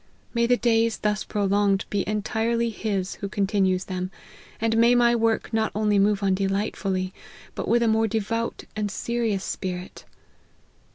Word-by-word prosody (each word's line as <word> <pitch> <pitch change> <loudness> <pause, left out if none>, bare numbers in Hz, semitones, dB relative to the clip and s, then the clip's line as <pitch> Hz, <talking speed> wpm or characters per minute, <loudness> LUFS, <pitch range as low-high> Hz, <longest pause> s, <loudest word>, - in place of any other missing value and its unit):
May 235 -1 +2
the 245 0 +4
days 230 -2 +2
thus 210 0 -1
prolonged 200 -1 +1
be 200 -2 +1
entirely 225 +2 0
His 200 -4 -2
who 200 - -3
continues 195 -2 +1
them! 185 -1 -3 0.5
and 225 0 +1
may 235 +2 +5
my 240 0 +4
work 225 0 0
not 220 0 +1
only 210 -1 +2
move 205 0 +2
on 195 -1 +3
delightfully, 195 -1 -1 0.4
but - - -4
with 235 0 +3
a - - +2
more 220 0 +3
devout 225 +2 -2
and 210 -1 -1
serious 225 -1 -1
spirit 180 -1 -5
210 Hz, 155 wpm, -25 LUFS, 195-230 Hz, 0.5 s, may